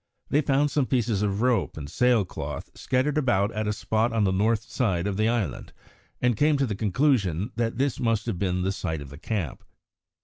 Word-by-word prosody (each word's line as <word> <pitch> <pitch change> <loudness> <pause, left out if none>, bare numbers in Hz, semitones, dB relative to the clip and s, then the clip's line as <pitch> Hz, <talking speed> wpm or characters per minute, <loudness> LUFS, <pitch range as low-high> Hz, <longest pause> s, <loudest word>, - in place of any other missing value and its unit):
They 145 - +4
found 145 +1 +2
some 140 -4 +1
pieces 115 -5 +1
of 105 +1 0
rope 125 -8 +1
and 75 -2 -6
sail 120 +5 +2
cloth - - -6
scattered 135 +4 0
about 105 -7 +2
at 110 -1 -2
a - - +1
spot 110 +2 0
on 115 -2 +1
the 95 - +2
north 110 +3 +1
side 95 -9 -1
of 100 -1 -1
the 110 +2 +2
island, 115 -5 -2 0.5
and 125 -1 +2
came 150 +6 +3
to 140 - +2
the 110 - -2
conclusion 105 - +1
that 115 -1 -1
this 135 -1 0
must 115 -2 +1
have 110 -7 -3
been 90 -2 0
the 95 - +1
site 80 -5 -3
of 70 - -9
the 70 - -10
camp. 95 - -3
110 Hz, 210 wpm, -26 LUFS, 95-125 Hz, 0.5 s, They